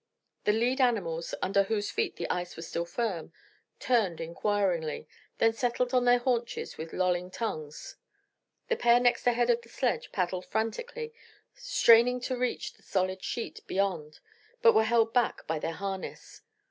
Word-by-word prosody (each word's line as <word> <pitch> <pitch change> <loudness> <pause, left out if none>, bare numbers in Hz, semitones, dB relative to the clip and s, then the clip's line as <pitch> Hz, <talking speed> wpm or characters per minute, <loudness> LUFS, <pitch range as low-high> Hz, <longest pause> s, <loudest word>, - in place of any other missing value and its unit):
The 210 - +5
lead 245 +5 +1
animals, 175 -10 0
under 195 +1 +3
whose 205 +1 -1
feet 440 -4 -1
the - - -4
ice 180 0 -3
was 165 - -7
still 170 - -2
firm, 175 -4 -3 0.5
turned 215 -9 +1
inquiringly, 170 -1 -1 0.3
then 225 0 +3
settled 245 +1 -1
on 250 -1 +3
their 245 0 +6
haunches 240 -1 -2
with 160 +1 -7
lolling 180 -1 0
tongues. 155 -8 -5 0.7
The 470 - 0
pair 240 0 +5
next 245 0 +2
ahead 240 0 +3
of 235 0 +1
the 235 - -18
sledge 245 0 -1
paddled 180 -1 -2
frantically, 460 - -3 0.4
straining 235 +2 +4
to 255 +1 -2
reach 250 0 -2
the - - -26
solid 185 -1 -1
sheet 235 - -4
beyond, 180 -6 -2 0.4
but 465 - +8
were 220 - +4
held 225 0 +2
back 245 -2 +1
by 160 -1 -2
their 165 - -3
harness. 195 0 -6
220 Hz, 160 wpm, -29 LUFS, 180-245 Hz, 0.7 s, but